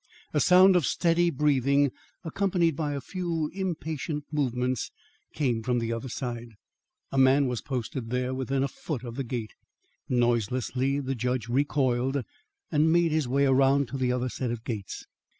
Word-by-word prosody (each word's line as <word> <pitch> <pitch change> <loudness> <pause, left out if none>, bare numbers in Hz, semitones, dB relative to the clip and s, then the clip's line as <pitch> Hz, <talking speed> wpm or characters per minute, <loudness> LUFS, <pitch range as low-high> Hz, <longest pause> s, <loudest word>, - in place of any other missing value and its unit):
A 150 - +2
sound 185 +3 +6
of 170 -7 +3
steady 170 0 +2
breathing, 140 -2 +2 0.3
accompanied 175 -2 +1
by 150 -1 -2
a 140 - -3
few 170 -4 -3
impatient 160 -5 -3
movements, 125 -4 -1 0.5
came 125 -6 0
from 125 +1 0
the 115 -1 -1
other 115 +3 -5
side. 120 -2 -5 0.6
A 135 - +1
man 135 +2 +5
was 125 -3 -2
posted 125 -2 -4
there 125 +1 -1
within 130 +1 -1
a - - +1
foot 140 -2 -6
of 120 -2 -6
the 135 +3 -3
gate. 115 -4 -5 0.6
Noiselessly 125 +3 +1
the 135 0 -2
judge 125 -1 -2
recoiled, 135 0 +1 0.5
and 155 +2 +3
made 170 -1 +3
his 155 -4 +1
way 140 +3 +2
around 135 0 +3
to 135 - -4
the 125 -1 +1
other 125 0 -1
set 125 0 -3
of 115 -1 -4
gates. 105 -6 -5
135 Hz, 165 wpm, -27 LUFS, 125-150 Hz, 0.6 s, sound